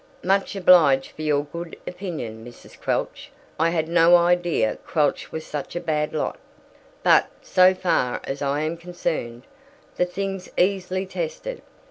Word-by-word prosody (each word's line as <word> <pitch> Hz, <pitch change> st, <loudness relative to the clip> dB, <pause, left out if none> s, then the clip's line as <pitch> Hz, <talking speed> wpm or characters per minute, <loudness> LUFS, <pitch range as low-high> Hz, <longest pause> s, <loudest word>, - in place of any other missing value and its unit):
"Much 195 Hz, +2 st, +1 dB
obliged 165 Hz, -8 st, +5 dB
for -, -, -10 dB
your 150 Hz, -2 st, +1 dB
good 170 Hz, +3 st, -8 dB
opinion, 160 Hz, -, -6 dB
Mrs. 120 Hz, +1 st, -13 dB
Quelch. -, -, -2 dB, 0.3 s
I 165 Hz, +1 st, +3 dB
had 160 Hz, -2 st, -1 dB
no 170 Hz, +1 st, +6 dB
idea 175 Hz, -9 st, +2 dB
Quelch 150 Hz, -4 st, 0 dB
was 160 Hz, 0 st, -5 dB
such 150 Hz, +2 st, -6 dB
a -, -, 0 dB
bad 150 Hz, -3 st, -1 dB
lot. 155 Hz, -, -3 dB, 0.6 s
But, -, -, +5 dB, 0.2 s
so 185 Hz, 0 st, +5 dB
far 175 Hz, -9 st, 0 dB
as 135 Hz, +1 st, -5 dB
I 140 Hz, +1 st, 0 dB
am 160 Hz, +2 st, -2 dB
concerned, 160 Hz, -9 st, -4 dB, 0.5 s
the 180 Hz, -, +3 dB
thing's 195 Hz, +1 st, -4 dB
easily 185 Hz, 0 st, +1 dB
tested. -, -, -5 dB
170 Hz, 145 wpm, -23 LUFS, 150-185 Hz, 0.6 s, no